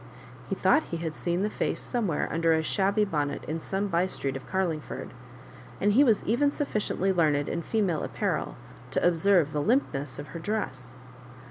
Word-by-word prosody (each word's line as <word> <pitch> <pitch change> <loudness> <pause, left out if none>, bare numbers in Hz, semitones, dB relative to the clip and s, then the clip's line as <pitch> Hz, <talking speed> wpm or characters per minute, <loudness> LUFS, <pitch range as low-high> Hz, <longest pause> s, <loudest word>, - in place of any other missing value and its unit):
He - - 0
thought 310 - +4
he 170 - -5
had 165 -1 -3
seen 175 +4 -1
the 210 - +1
face - - -1
somewhere 215 - -1
under 165 0 +2
a 160 0 +1
shabby 200 +5 +2
bonnet 150 -7 -2
in 160 +2 -3
soma 195 +5 -2
by 175 0 +1
street 135 -7 -2
of 135 - -7
Carlingford, 175 -6 -3 0.7
and 205 +1 +3
he 270 +6 +6
was 225 -7 +3
even 250 +7 +2
sufficiently 215 -9 -1
learned 150 -5 +2
in 170 - -2
female 185 -3 0
apparel - - -2 0.3
to - - +2
observe 175 -2 +3
tlie 150 -1 -2
limpness 145 - 0
of 145 +1 -7
her 170 - -6
dress. 130 - -4
175 Hz, 175 wpm, -28 LUFS, 155-205 Hz, 0.7 s, he